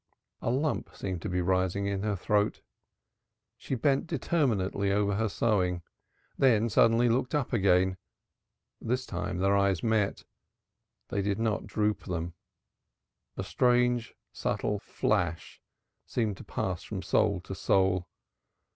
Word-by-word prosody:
A - - -1
lump 140 +5 -1
seemed 95 -3 -4
to - - -4
be 90 0 0
rising 95 +2 +1
in 100 -1 -1
her 105 0 0
throat. 105 +2 0 0.9
She 135 - -4
bent 135 +6 +1
determinedly 115 - 0
over 100 0 +2
her 110 +2 0
sewing, 90 -5 +1 0.6
then 115 -4 +4
suddenly 115 +3 +4
looked 125 +4 +1
up 140 -4 -1
again. 95 -3 +3 0.8
This 125 +2 -1
time 90 0 -3
their 95 +2 +2
eyes 100 -3 +2
met. 110 -3 +1 0.9
They 100 - -1
did 100 0 0
not 110 -1 -1
droop 105 -1 -1
them; 85 -2 -3 1.0
a - - -2
strange 125 -2 +2 0.2
subtle 105 -1 -1
flash 85 -4 -1 0.5
seemed 110 -5 -1
to - - -10
pass 90 -3 -3
from 95 -3 -6
soul 100 +1 +2
to 95 - -7
soul. 95 -1 +2
100 Hz, 130 wpm, -29 LUFS, 95-115 Hz, 1.0 s, then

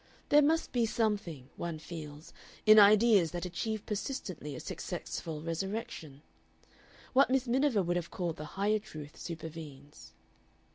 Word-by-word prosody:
There 295 - +7
must 320 +3 +2
be 235 -2 +2
something, 200 - -1
one 170 -2 -4
feels, 155 -1 -9 0.3
in 215 0 +9
ideas 205 -3 +6
that 175 +1 -3
achieve 215 +4 -3
persistently 200 - -4
a - - -6
successful 155 -2 -5
resurrection. 165 - -5 0.9
What 270 +1 +5
Miss 265 0 +2
Miniver 250 -4 +2
would 175 0 0
have 170 -1 -4
called 175 -4 -3
the 155 - -6
Higher 210 +2 +2
Truth 155 -8 -10
supervenes. 155 -4 -9
180 Hz, 135 wpm, -32 LUFS, 155-220 Hz, 0.9 s, in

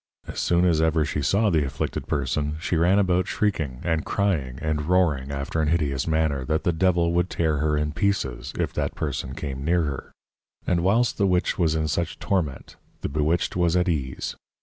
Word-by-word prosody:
As - - -6
soon 85 +1 +2
as 80 -3 +3
ever 80 -1 +2
she 75 - -2
saw 100 +10 +2
the 80 -3 +3
Afflicted 70 - -3
Person, 75 +2 -1
she 85 - -1
ran 85 +4 +4
about 90 -2 +2
shrieking, 80 -11 -1
and 80 -3 0
crying, 80 -11 -1
and 75 -1 -2
roaring 80 -7 +2
after 70 +3 -2
an 75 - +1
hideous 75 -4 0
manner, 80 -4 +1
that 80 +4 0
the 85 - +1
Devil 85 0 +2
would 90 +1 +1
tear 80 -3 0
her 75 0 +1
in 75 0 -1
pieces, 70 - -1
if - - -1
that - - -2
person 65 - -3
came 70 -3 -5
near 85 +2 +2
her. 70 -4 -4 0.5
And 85 -1 +1
whilst 110 +6 +2
the 100 - +4
Witch 90 0 +1
was 80 -2 +2
in 80 -1 0
such 85 +2 -2
Torment, 80 -9 -2 0.2
the - - -2
Bewitched 75 +4 0
was 85 -1 +2
at 90 +1 +2
ease. 70 -7 -2
80 Hz, 195 wpm, -25 LUFS, 75-90 Hz, 0.5 s, ran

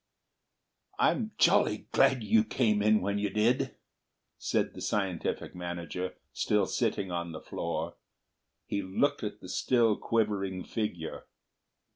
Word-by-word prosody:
"I'm 220 -3 +2
jolly 170 - +3
glad 135 -3 +4
you 110 +1 +4
came 110 -2 +1
in 110 +1 +4
when 100 +2 0
you 105 0 0
did," 110 +5 +1 0.6
said - - 0
the - - -9
scientific 95 -5 -1
manager, 90 +1 -4 0.2
still 105 -2 +2
sitting 100 -5 -1
on 85 -1 -3
the 80 - -6
floor. - - -4 0.7
He 100 - -2
looked 140 +10 0
at 105 0 -4
the - - -9
still 115 +2 +3
quivering 100 -5 0
figure. 95 -8 -4
105 Hz, 125 wpm, -30 LUFS, 95-115 Hz, 0.7 s, glad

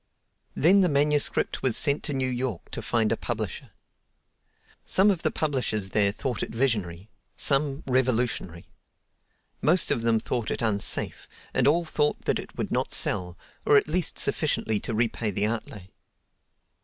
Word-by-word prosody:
Then 190 +7 +4
the 180 - +3
manuscript 145 0 +1
was 130 -4 +2
sent 145 -1 +3
to 150 - -2
New 130 -1 -1
York 125 -6 -4
to - - -5
find 110 -2 0
a - - +2
publisher. 115 +2 -4 1.1
Some 200 +2 +4
of 180 -4 -2
the - - +1
publishers 125 -10 -2
there 100 0 +3
thought 125 +4 -4
it - - -3
visionary; 105 -6 -2 0.3
some, 140 0 +1
revolutionary. 125 -9 -1 1.0
Most 175 +4 +3
of 115 - 0
them 115 -1 +2
thought 120 0 -3
it - - -3
unsafe, 105 -3 0 0.2
and - - +2
all 170 +4 +3
thought 150 -2 -1
that - - +1
it - - -10
would - - -3
not - - 0
sell, 90 -1 0 0.3
or 145 - +5
at - - +2
least 170 +2 -1
sufficiently 110 -2 0
to 115 - -4
repay 115 -1 -1
the 100 +1 0
outlay. 110 -3 -4
120 Hz, 155 wpm, -26 LUFS, 110-145 Hz, 1.1 s, or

